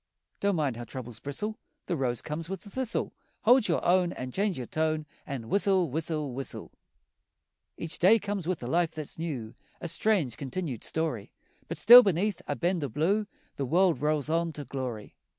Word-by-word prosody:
Don't 200 -1 +1
mind 145 -7 0
how 120 - -5
troubles 120 -1 -7
bristle, 210 +12 -4 0.3
The 175 - -1
rose 125 -5 -1
comes 160 +2 -5
with 195 -2 -5
the 205 - -13
thistle. 260 -1 -2 0.3
Hold 245 +1 +5
your 170 - 0
own 180 0 +3
An' 130 0 -6
change 200 +4 0
your 125 - -4
tone 155 +2 -1 0.2
An' 130 -6 -5
whistle, 190 - +2
whistle, 155 -2 -2
whistle! 135 +2 -5 1.1
Each 165 +2 -5
day 200 +6 +6
comes 200 -4 -4
with 180 -7 -2
a - - -4
life 165 +3 +1
that's 155 0 -6
new, 130 -10 -4 0.3
A - - -4
strange, 170 - +1
continued 140 - -4
story 155 -10 -2 0.4
But - - -4
still 240 +3 +11
beneath 195 -1 0
a 145 - -1
bend 175 +5 0
o' 140 - -2
blue 195 - +1 0.3
The 140 - -1
world 175 +2 +3
rolls 150 -1 +1
on 165 +1 0
to 145 -1 -7
glory. 125 -6 -5
160 Hz, 185 wpm, -29 LUFS, 135-190 Hz, 1.1 s, still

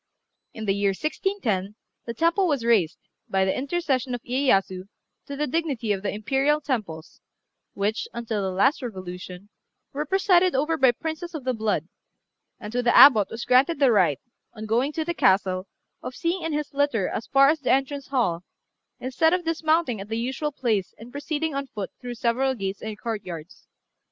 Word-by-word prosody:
In 220 - -5
the 195 - +2
year 200 -1 +1
1610 240 - -2 0.3
the 235 - -4
temple 340 - +2
was 280 -7 -1
raised, 205 -9 +2 0.3
by 190 0 +2
the 190 - 0
intercession 275 -4 -1
of 240 - -9
Iyéyasu, 195 -8 +1 0.4
to 280 - -5
the 300 +2 -1
dignity 275 -7 -1
of 195 -2 -1
the 205 - -2
Imperial 270 +8 +1
Temples, 210 - -5 0.5
which, 205 +2 -1
until 230 -3 -3
the 190 - -1
last 200 +12 +2
revolution, 185 -3 -8 0.4
were 295 +2 -3
presided 370 -1 +3
over 300 +5 +1
by 265 -5 +5
princes 320 +6 -6
of 300 - -5
the 255 0 0
blood; 215 -8 -1 0.7
and 210 +1 -8
to 245 - +1
the 240 -1 +3
Abbot 220 -8 +8
was 230 - -6
granted 260 +6 +4
the 275 -3 +4
right, 180 - +3 0.4
on 215 0 -7
going 240 +6 +1
to 320 0 -2
the 345 - -1
castle, 190 - +2 0.3
of 255 - -7
sitting 345 +2 -1
in 325 - -3
his 300 -1 -3
litter 280 -9 +1
as 225 - -4
far 275 0 +5
as 315 +1 +1
the 275 - -3
entrance 275 +1 0
hall, 205 -11 0 0.6
instead 320 +7 +2
of 360 -2 -4
dismounting 320 -7 +1
at 200 - -9
the 225 - -2
usual 265 +6 -2
place 225 -9 -1
and 230 +2 -12
proceeding 295 +2 -3
on 275 0 -3
foot 205 -6 -6
through 245 -1 -6
several 250 +3 0
gates 195 -3 -4
and 215 -1 -6
courtyards. 185 -8 -6
245 Hz, 180 wpm, -25 LUFS, 205-295 Hz, 0.7 s, Abbot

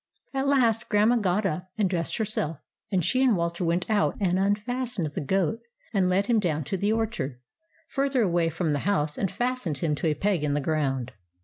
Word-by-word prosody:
At 270 0 0
last 240 -5 +2
Grandma 215 +3 +4
got 205 -1 +1
up 180 0 -2
and 210 -3 +2
dressed 175 -2 -2
herself, 180 -9 -1 0.3
and 180 -5 +1
she 255 - +2
and 245 -7 +4
Walter 170 +1 -2
went 170 +1 0
out 210 -2 +1
and 185 -2 +1
unfas 230 +5 -1
tened 155 -5 -2
the - - -3
goat 190 +6 0 0.3
and 190 -3 +2
led 190 +2 +2
him 230 0 +3
down 155 -6 0
to 145 - -3
the 205 +3 +1
orchard, 220 - -2 0.5
further 275 -4 +1
away 170 -3 +2
from 165 -1 -1
the 145 - 0
house, 150 -7 +1
and 195 - -1
fastened 245 - -2
him 150 +3 0
to 150 - -1
a 155 - +1
peg 190 -1 0
in 145 -1 +1
the - - +1
ground. 135 -4 -1
190 Hz, 210 wpm, -26 LUFS, 160-220 Hz, 0.5 s, Grandma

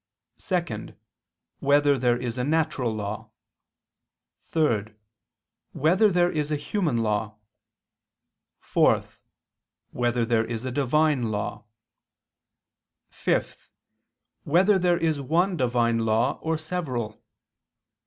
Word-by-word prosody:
(2) 175 -4 -3 0.6
Whether 145 0 +4
there 125 -2 +2
is 125 0 -4
a - - 0
natural 150 -4 0
law? 110 +1 -5 1.1
(3) 120 -11 0 0.9
Whether 185 +9 +3
there 175 -1 +3
is 150 -1 -2
a - - +2
human 155 - -1
law? 105 0 -1 1.3
(4) - - +2 0.9
Whether 120 -1 0
there 115 -1 +2
is 115 +1 -5
a 130 - -2
Divine 140 -1 +1
law? 105 -1 -4 1.5
(5) - - -2 0.7
Whether 190 +6 +3
there 175 -1 +2
is 160 -4 0
one 175 +7 +1
Divine 120 -4 +1
law, 115 0 +1
or 160 0 -1
several? 155 -8 -4
140 Hz, 100 wpm, -25 LUFS, 115-160 Hz, 1.5 s, Whether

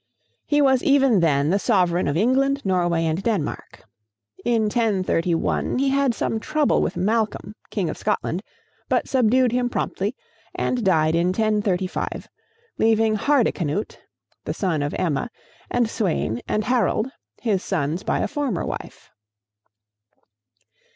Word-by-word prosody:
He 290 0 +3
was 265 -2 +4
even 270 -6 +4
then 150 -2 +2
the 200 - +2
sovereign 180 -6 +2
of 145 +2 0
England, 275 +6 +2
Norway, 175 -3 +1
and 160 +3 -1
Denmark. 200 -9 -3 0.6
In 235 -2 +2
1031 195 -7 0
he 270 +1 +2
had 275 -3 +2
some 225 - -1
trouble 305 +4 +1
with - - -2
Malcolm, 215 0 -1 0.2
King 195 -5 -1
of - - -5
Scotland, 175 - -1 0.5
but - - +1
subdued 255 -1 +3
him 245 0 0
promptly, 205 0 -2 0.4
and 245 -2 -1
died 160 -5 +3
in 170 +1 +2
1035, 195 -2 -1 0.5
leaving 220 0 +3
Hardicanute, 210 - 0 0.4
the - - -4
son 170 -7 -1
of 145 0 -2
Emma, 170 - -1 0.4
and 245 -2 +1
Sweyn 170 - -1
and 215 - 0
Harold, 245 0 +1 0.3
his 205 -5 0
sons 160 -1 -1
by - - -1
a - - 0
former 275 - -2
wife. - - -7
210 Hz, 130 wpm, -23 LUFS, 175-245 Hz, 0.6 s, was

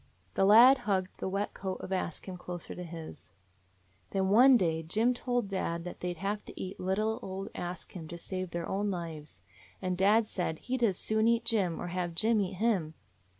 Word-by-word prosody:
The 195 - +3
lad 240 +7 +8
hugged 190 -1 +1
the - - -2
wet 200 +2 -2
coat 190 -1 -4
of 190 - -5
Ask 180 -2 -3
Him 185 - -5
closer 175 -1 -7
to 180 - -7
his. 165 -2 -9 0.8
"Then 190 -1 0
one 250 +5 +7
day 165 -5 0
Jim 220 +10 +2
told 245 -3 -1
dad 170 -3 -2
that 180 - -7
they 180 - -2
'd 175 - -7
have 200 +4 -2
to - - -10
eat 190 0 -6
little 215 +4 0
old 195 +1 -5
Ask 175 +1 -6
Him 165 -4 -8
to 170 - -7
save 185 +1 -4
their 170 0 -4
own 205 +2 -1
lives. 155 - -6 0.4
And 185 -1 -1
dad 205 +5 +4
said 180 -6 -3
he 255 - -3
'd 255 - -4
as 195 -6 +3
soon 220 +1 +1
eat 235 0 +2
Jim, 195 -8 +1
or 175 - -4
have 175 -1 -3
Jim 220 +3 +3
eat 195 -1 -2
him. 185 -6 0
190 Hz, 210 wpm, -31 LUFS, 175-215 Hz, 0.8 s, lad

